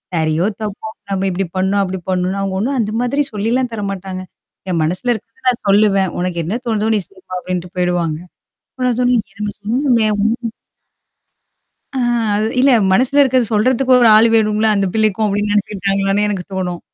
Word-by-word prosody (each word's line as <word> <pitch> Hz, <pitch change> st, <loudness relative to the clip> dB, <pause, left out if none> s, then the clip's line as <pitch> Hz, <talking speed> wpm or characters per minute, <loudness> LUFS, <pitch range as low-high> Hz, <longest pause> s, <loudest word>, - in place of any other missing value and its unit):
சரியோ, 160 Hz, +2 st, +1 dB, 0.2 s
தப்போ! 210 Hz, -2 st, -5 dB, 0.3 s
நம்ம 195 Hz, 0 st, -1 dB
இப்டி 190 Hz, +1 st, -2 dB
பண்ணோம். 195 Hz, +2 st, +1 dB
அப்படி 190 Hz, 0 st, -4 dB
பண்ணோம்ன்னா 185 Hz, +1 st, 0 dB
அவுங்க 190 Hz, -1 st, -2 dB
ஒண்ணும் 265 Hz, +5 st, -1 dB
அந்த 215 Hz, -1 st, -1 dB
மாதிரி 280 Hz, +4 st, 0 dB
சொல்லிலாம் 235 Hz, +4 st, 0 dB
தரமாட்டாங்க. 195 Hz, -3 st, -4 dB, 0.5 s
என் 170 Hz, -3 st, 0 dB
மனசுல 180 Hz, +10 st, -1 dB
இருக்கறத 230 Hz, +2 st, -11 dB
நான் 245 Hz, -, -2 dB
சொல்லுவேன். 195 Hz, -2 st, +3 dB
"உனக்கு 180 Hz, -1 st, -2 dB
என்னா 200 Hz, +9 st, -2 dB
தோணுதோ 220 Hz, -1 st, 0 dB
நீ -, -, +2 dB
செய்யுமா?" 185 Hz, -1 st, -10 dB
அப்டின்ட்டு 180 Hz, 0 st, -5 dB
போயிடுவாங்க. 175 Hz, -3 st, 0 dB, 0.5 s
அப்ப 255 Hz, -1 st, -4 dB
நான் 240 Hz, -, 0 dB
சொல்லுவேன், 245 Hz, -3 st, +2 dB
"என்னமோ 210 Hz, 0 st, -4 dB
சொன்னீங்களே 230 Hz, 0 st, +1 dB
ஒண்ணும்" 230 Hz, +1 st, -1 dB, 1.4 s
ஆ -, -, -2 dB, 0.4 s
அது 215 Hz, +1 st, 0 dB
இல்ல, 275 Hz, +1 st, +5 dB, 0.2 s
"மனசுல 260 Hz, +7 st, +3 dB
இருக்கறது 255 Hz, -4 st, +2 dB
சொல்றதுக்கும் 255 Hz, +4 st, +3 dB
ஒரு 230 Hz, -, +6 dB
ஆளு 225 Hz, +2 st, +6 dB
வேணும்ல 215 Hz, 0 st, +3 dB
அந்த 200 Hz, -, +1 dB
பிள்ளைக்கும்!" 215 Hz, -1 st, +1 dB
அப்ப்டின்னு 205 Hz, +1 st, 0 dB
நெனச்சுக்கிட்டாங்களான்னே, 200 Hz, 0 st, 0 dB
எனக்கு 195 Hz, -4 st, -3 dB
தோணும். 180 Hz, -2 st, -3 dB
205 Hz, 165 wpm, -17 LUFS, 190-230 Hz, 1.4 s, ஒரு